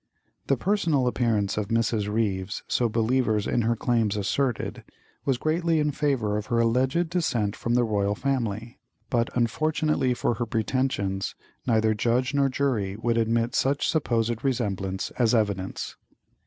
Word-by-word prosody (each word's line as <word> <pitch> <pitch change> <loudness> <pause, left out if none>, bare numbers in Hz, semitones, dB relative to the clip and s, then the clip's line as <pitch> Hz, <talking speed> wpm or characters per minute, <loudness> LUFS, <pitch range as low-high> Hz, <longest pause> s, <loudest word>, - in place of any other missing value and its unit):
The 135 - +2
personal 165 - +1
appearance 115 -5 +1
of 105 -2 -1
Mrs. 115 -2 0
Ryves, 100 -3 -1
so 120 -2 +1
believers 110 -1 +1
in 120 - +1
her 115 +1 +1
claims 115 -3 +1
asserted, 120 +4 -1 0.4
was 135 -3 +2
greatly 165 +3 +1
in 150 -1 +1
favour 135 -8 0
of 105 - -4
her 120 - 0
alleged 130 +8 +2
descent 120 - 0
from 120 0 -1
the 125 - +4
royal 105 -2 0
family; 115 -4 -2 0.3
but, 120 -1 +1
unfortunately 150 +2 +1
for 120 - 0
her 120 +1 -3
pretensions, 110 -4 -1 0.3
neither 110 -2 +3
judge 120 +5 +1
nor 140 -1 +3
jury 120 -8 -1
would 115 +2 0
admit 115 +1 +1
such 140 +2 +1
supposed 120 -6 0
resemblance 100 -8 -1
as 120 -1 +4
evidence. 100 -4 -2
115 Hz, 145 wpm, -26 LUFS, 105-130 Hz, 0.4 s, the